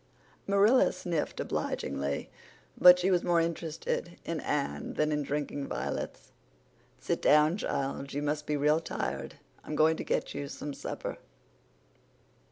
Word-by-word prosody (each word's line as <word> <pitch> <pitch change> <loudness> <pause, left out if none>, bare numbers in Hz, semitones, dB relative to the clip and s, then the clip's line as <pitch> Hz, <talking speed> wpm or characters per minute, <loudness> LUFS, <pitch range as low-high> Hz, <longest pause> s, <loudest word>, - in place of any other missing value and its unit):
Marilla 200 +6 +5
sniffed 170 -4 -3
obligingly, 70 +1 -2 0.4
but 180 0 +9
she 180 +2 +1
was 180 -2 +3
more 175 -1 +3
interested 165 +1 -2
in 165 -1 -2
Anne 140 - -2
than 150 0 +1
in 150 0 0
drinking 145 0 -3
violets. - - -4 0.7
"Sit - - -2
down, 150 +3 +5
child. 140 -5 -3
You 145 +1 -3
must 150 0 -2
be 150 - 0
real 150 +2 +3
tired. 165 - -4 0.3
I'm 155 - -5
going 160 +1 +4
to - - -4
get - - -1
you 140 0 -4
some 145 +1 -6
supper." - - -5
150 Hz, 140 wpm, -30 LUFS, 145-170 Hz, 0.7 s, but